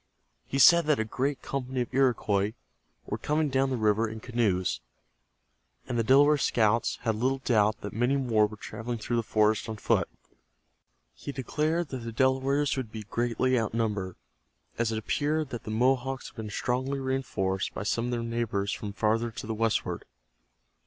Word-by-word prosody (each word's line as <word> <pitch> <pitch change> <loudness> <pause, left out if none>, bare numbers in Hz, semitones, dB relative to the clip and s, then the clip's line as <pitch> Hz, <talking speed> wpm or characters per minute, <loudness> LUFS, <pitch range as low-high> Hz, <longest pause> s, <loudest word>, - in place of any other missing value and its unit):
He 135 - -2
said 170 +4 +7
that 150 -5 +3
a - - +2
great 130 +4 -2
company 130 -1 -3
of 120 - -4
Iroquois 110 -6 +2 0.5
were - - -4
coming 150 0 0
down 135 0 +1
the 130 - -1
river 110 0 +2
in 110 0 -7
canoes, 105 - 0 1.1
and 125 - -3
the 115 - +2
Delaware 145 +5 +5
scouts 115 -2 +2
had 115 - +1
little 130 +5 0
doubt 110 -5 +2
that 100 - -6
many 125 +5 +1
more 115 -5 +3
were 110 +1 -11
traveling 120 +3 -5
through 120 +2 -2
the - - +2
forest 110 0 +1
on 110 - -4
foot. - - +1 1.0
He - - -7
declared 155 +5 -1
that 130 - -4
the 115 -1 -6
Delawares 135 +4 +2
would 125 -5 -4
be 110 -1 -6
greatly 120 +3 0
outnumbered, 105 -4 -2 0.6
as 115 -1 +1
it 110 - -1
appeared 145 +6 -1
that 120 - -6
the - - -5
Mohawks 130 +3 0
had - - -23
been 110 -2 -6
strongly 130 +6 -1
reinforced 130 -8 -1
by - - -3
some 115 +3 0
of 125 - -2
their 120 -1 -1
neighbors 115 -4 -1
from 105 -2 -5
farther 115 +3 +1
to 115 - -8
the 110 - -3
westward. 115 0 -1
120 Hz, 175 wpm, -28 LUFS, 110-135 Hz, 1.1 s, said